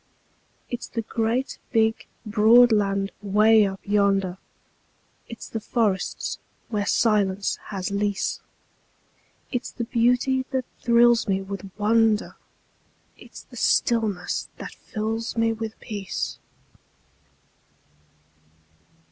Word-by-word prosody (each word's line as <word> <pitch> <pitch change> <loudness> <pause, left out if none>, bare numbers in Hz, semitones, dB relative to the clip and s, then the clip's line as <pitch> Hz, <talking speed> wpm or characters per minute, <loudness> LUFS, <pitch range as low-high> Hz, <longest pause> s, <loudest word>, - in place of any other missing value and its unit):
It's 245 - -4
the 230 - -4
great, 230 +4 -1
big, 225 -1 +1 0.2
broad 225 +3 +6
land 195 -2 +1
'way 210 +1 +5
up 195 0 -6
yonder, 195 -2 +1 0.9
It's 230 - -8
the 225 - -4
forests 210 -4 -1 0.3
where 210 -3 -1
silence 200 -3 +1
has 195 -2 -4
lease; 205 0 -1 1.1
It's 245 -2 -3
the 240 - -5
beauty 250 +2 +2
that 260 -2 -2 0.2
thrills 235 0 +4
me 195 -1 +1
with 195 0 -7
wonder, 220 0 +2 0.8
It's - - -13
the - - -14
stillness 215 -7 +1
that - - -8
fills 225 +1 -4
me 225 0 +2
with 225 0 -6
peace. 200 -4 -5
220 Hz, 100 wpm, -24 LUFS, 200-230 Hz, 1.1 s, broad